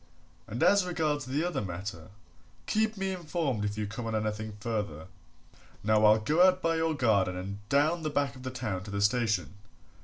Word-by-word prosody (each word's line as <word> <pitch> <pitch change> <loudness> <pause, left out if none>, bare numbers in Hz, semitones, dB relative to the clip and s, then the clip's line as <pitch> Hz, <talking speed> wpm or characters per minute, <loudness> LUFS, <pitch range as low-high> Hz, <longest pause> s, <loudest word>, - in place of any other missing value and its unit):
And 115 - -2
as 200 -1 +5
regards 155 -6 -1
the 140 +5 -1
other 175 -6 -1
matter 90 -3 -6 0.6
keep 220 0 +1
me 195 0 -1
informed 160 - -2
if 105 0 -2
you 105 - -1
come 115 +3 -5
on 110 - -2
anything 110 0 -3
further. 105 -9 -3 0.8
Now 110 0 +3
I'll 105 +1 +7
go 150 +10 +2
out 185 0 +6
by 165 -2 +1
your 160 -1 +1
garden 100 -8 +2
and 100 +2 -5
down 155 +6 +3
the 155 - -1
back 140 -2 0
of 130 - -11
the 130 - -4
town 120 -7 -3
to - - -8
the 100 0 -2
station. 105 - +1
120 Hz, 190 wpm, -29 LUFS, 105-160 Hz, 0.8 s, I'll